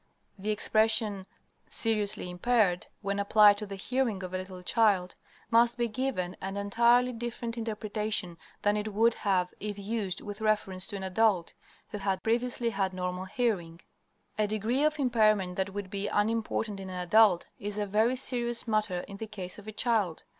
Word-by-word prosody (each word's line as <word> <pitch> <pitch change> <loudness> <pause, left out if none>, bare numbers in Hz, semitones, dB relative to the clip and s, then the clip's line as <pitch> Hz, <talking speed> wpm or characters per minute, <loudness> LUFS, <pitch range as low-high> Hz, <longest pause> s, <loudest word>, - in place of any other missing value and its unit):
The 205 +3 -4
expression 215 -2 +2 0.4
"seriously 210 -5 0
impaired," 190 -1 +1 0.2
when 200 0 -1
applied 205 0 +6
to 210 - -6
the 200 - -6
hearing 225 -1 -1
of 185 0 -6
a - - 0
little 185 -1 -8
child, 195 -3 +2 0.4
must 235 +1 +5
be 240 -1 +1
given 215 -6 -2
an 195 +1 -4
entirely 235 +5 +3
different 235 0 -5
interpretation 215 -5 -2 0.2
than 205 0 +3
it 210 0 -3
would 230 +2 +4
have 185 -4 0
if 210 -1 -4
used 200 -3 -3
with 205 +1 -8
reference 205 -4 +1
to - - -5
an 195 - -5
adult 190 -2 +1 0.4
who 210 - -5
had 195 -1 -1
previously 235 +1 0
had 195 -2 -1
normal 180 0 -3
hearing. 190 -6 -2 0.6
A 210 - +3
degree 220 +6 0
of 305 0 +2
impairment 215 -8 +2
that 190 +1 -1
would 200 -1 -6
be 200 0 -2
unimportant 215 -1 -1
in 190 -1 -7
an 185 -1 -5
adult 180 0 +4
is 205 0 -4
a 210 - 0
very 215 +5 +2
serious 240 -2 0
matter 210 -5 0
in 200 +1 -10
the 220 - -6
case 195 -3 -6
of 205 - -14
a - - -4
child. 215 -7 0
210 Hz, 175 wpm, -29 LUFS, 190-225 Hz, 0.6 s, applied